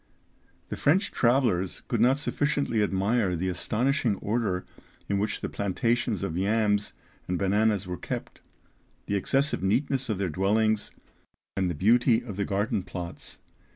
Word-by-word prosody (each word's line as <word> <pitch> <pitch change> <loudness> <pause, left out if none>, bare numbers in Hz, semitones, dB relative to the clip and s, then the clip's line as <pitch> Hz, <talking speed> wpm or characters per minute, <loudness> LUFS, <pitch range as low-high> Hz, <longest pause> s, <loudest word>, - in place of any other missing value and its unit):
The - - -3
French 185 +8 +2
travellers 115 -8 +1
could - - 0
not 130 +3 +5
sufficiently 145 -5 0
admire 100 0 +1
the 90 +3 -1
astonishing 115 - 0
order 100 -4 -1 0.4
in 100 -1 0
which 105 +2 -2
the - - -2
plantations 115 +1 -1
of 80 - -3
yams 105 +2 +1 0.3
and 90 - -1
bananas 105 +1 +2
were 90 0 -4
kept, - - -6 0.6
the 100 - -1
excessive 135 +8 +1
neatness 130 +6 +1
of 110 - 0
their 95 -1 -1
dwellings, 105 +5 +1 0.7
and 95 -2 0
the 85 - -3
beauty 115 - +3
of 105 -5 -7
the 100 0 -1
garden 105 +2 0
plots. 90 -1 -7
105 Hz, 145 wpm, -27 LUFS, 95-120 Hz, 0.7 s, not